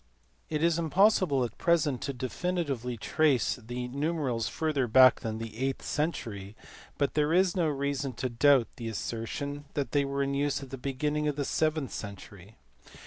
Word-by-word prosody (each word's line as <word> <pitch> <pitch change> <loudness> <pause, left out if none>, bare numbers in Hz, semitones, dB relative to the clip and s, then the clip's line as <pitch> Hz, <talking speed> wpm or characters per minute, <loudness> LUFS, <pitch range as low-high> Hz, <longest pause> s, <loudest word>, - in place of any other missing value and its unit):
It 155 0 -1
is 170 0 +3
impossible 170 - +3
at 115 -3 -5
present 155 -6 +2
to 140 - -2
definitely 130 -2 -2
trace 130 -4 +2
these 125 +1 -6
numerals 140 -5 -1
further 150 -5 -1
back 130 +2 +7
than 110 -1 -4
the 115 -1 -7
eighth 135 +1 -1
century, 110 - -3 0.4
but 140 - 0
there 150 0 +1
is 185 0 +3
no 175 -3 +2
reason 140 -2 -2
to 130 - -2
doubt 130 +1 +4
the 115 - -5
assertion 140 +7 -4
that 140 -2 -2
they 145 -1 +2
were 140 0 -1
in 140 0 -1
use 140 0 0
at 130 - -11
the 135 - -5
beginning 150 +3 -1
of 150 - 0
the 145 -1 -2
seventh 155 -3 0
century. 100 0 -9
140 Hz, 170 wpm, -29 LUFS, 120-150 Hz, 0.4 s, back